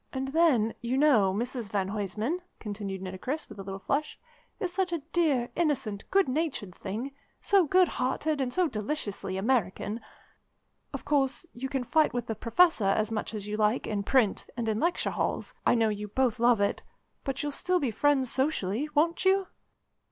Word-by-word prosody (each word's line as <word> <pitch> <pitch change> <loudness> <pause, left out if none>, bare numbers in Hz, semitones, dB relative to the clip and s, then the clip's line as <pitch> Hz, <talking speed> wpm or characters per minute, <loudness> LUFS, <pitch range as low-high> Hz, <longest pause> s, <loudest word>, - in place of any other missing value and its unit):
"And 265 0 -3
then, 275 -8 +3
you 240 +2 -1
know, 255 -10 +5
Mrs 235 +2 -3
van 195 -1 -1
Huysman," 210 - -2 0.2
continued 200 -3 -5
Nitocris 190 +12 -4
with 210 -2 -12
a - - -3
little 195 0 -5
flush, 285 +9 -2 0.4
"is 365 -5 -2
such 370 -1 0
a 335 -4 -2
dear, 275 -8 +2
innocent, 260 -11 -1
good 390 -4 +3
natured 260 - -2
thing, 220 +10 -5 0.3
so 390 -5 +3
good 370 +3 +5
hearted 290 +3 -1
and 255 -2 -1
so 360 +5 +2
deliciously 210 -6 -3
American. 215 0 0 0.9
Of - - -6
course, 280 +1 +1
you 265 +3 -5
can 270 -2 -1
fight 310 +2 +2
with 240 -2 -1
the 225 - -2
Professor 240 - +3
as 215 +3 +1
much 220 0 -3
as 205 -1 -5
you 210 0 -3
like 215 +3 +2
in 210 -2 -1
print, 220 0 +2
and 235 -2 -2
in 215 0 0
lecture 345 +6 0
halls - - -2
I - - +5
know 225 -2 +3
you 210 0 -3
both 250 +2 0
love 235 -1 +4
it 200 - 0 0.4
but 270 0 -3
you'll 295 - -1
still 360 +5 0
be 270 -7 0
friends 265 +2 +2
socially, 265 -2 0
won't 335 +4 +2
you?" 380 0 +3
245 Hz, 180 wpm, -29 LUFS, 210-300 Hz, 0.9 s, know